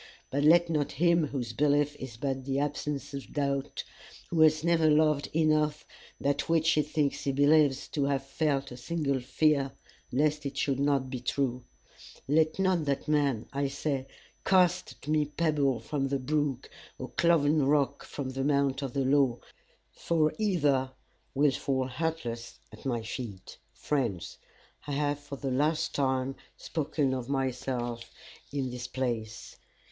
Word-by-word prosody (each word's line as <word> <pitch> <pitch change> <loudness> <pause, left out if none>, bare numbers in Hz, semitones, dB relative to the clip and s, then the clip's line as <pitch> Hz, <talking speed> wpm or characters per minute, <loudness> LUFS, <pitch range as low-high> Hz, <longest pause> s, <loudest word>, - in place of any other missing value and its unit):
But 140 +2 0
let 170 +3 +6
not 150 -3 -1
him 170 +1 +3
whose 125 -5 -4
belief 145 +2 +2
is 125 -4 -8
but 135 +1 -2
the 135 0 -1
absence 145 0 -2
of 140 -1 -7
doubt, 140 -2 -2 0.5
who 170 - 0
has 155 0 +5
never 165 -2 +3
loved 150 -1 +3
enough 155 -1 +1 0.3
that 140 +2 -1
which 165 -1 +3
he 150 - +3
thinks 150 -1 -1
he 140 - +1
believes 145 0 +3
to 145 -2 0
have 135 -1 0
felt 140 -1 -1
a 125 - -8
single 140 0 -1
fear 140 +2 +1 0.4
lest 150 +3 +1
it 140 -1 -5
should 135 -2 0
not 140 -2 +1
be 130 - -3
true 125 0 -1 0.6
let 155 +2 +2
not 185 -4 +2
that 140 +1 -1
man, 140 -7 +1
I 140 0 0
say, 135 -1 -2 0.4
cast 180 -2 +3
at - - -12
me 150 0 +2
pebble 145 -4 +1
from 135 +4 -2
the 140 +1 0
brook, 140 -1 -1 0.3
or 130 - -6
cloven 155 -3 +3
rock 140 -1 +1
from 135 -2 -5
the 135 0 -3
mount 140 -1 +1
of 135 -3 -4
the 135 -1 0
law, 135 -3 +3 0.5
for 155 - +1
either 145 -11 +1 0.4
will 145 +1 +4
fall 130 0 -1
hurtless 125 -4 -4
at - - -8
my 120 -3 -1
feet. 110 -4 -7
Friends, 120 - -2 0.5
I 145 - -3
have 145 0 0
for 145 -1 -8
the 135 -1 -3
last 150 +5 +1
time 130 -1 0 0.2
spoken 145 -3 -1
of 130 -1 -4
myself 125 -3 -2 0.4
in 135 -3 -2
this 125 0 -5
place. 115 -4 -4
140 Hz, 155 wpm, -29 LUFS, 130-150 Hz, 0.6 s, let